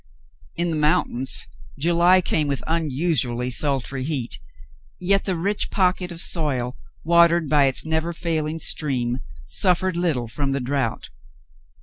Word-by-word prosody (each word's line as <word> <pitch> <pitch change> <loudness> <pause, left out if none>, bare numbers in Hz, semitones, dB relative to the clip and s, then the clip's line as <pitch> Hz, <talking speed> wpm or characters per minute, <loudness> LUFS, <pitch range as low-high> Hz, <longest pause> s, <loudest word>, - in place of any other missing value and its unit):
In 170 0 -1
the 160 - -1
mountains, 140 -4 +1 0.3
July 175 +4 +4
came 155 -3 0
with 140 -2 -2
unusually 145 -6 -1
sultry 135 0 -1
heat, 130 - -3 0.6
yet 195 +2 +2
the 190 - 0
rich 200 +5 -1
pocket 180 -1 +1
of 170 - -7
soil, 135 -8 0 0.3
watered 170 0 +4
by 145 -1 +4
its 135 +2 0
never 160 +1 -1
failing 160 -2 -2
stream, 130 -6 0 0.3
suffered 185 - +2
little 160 -9 0
from 135 +4 -2
the 140 - 0
drought. 130 -2 -2
155 Hz, 130 wpm, -23 LUFS, 135-170 Hz, 0.6 s, July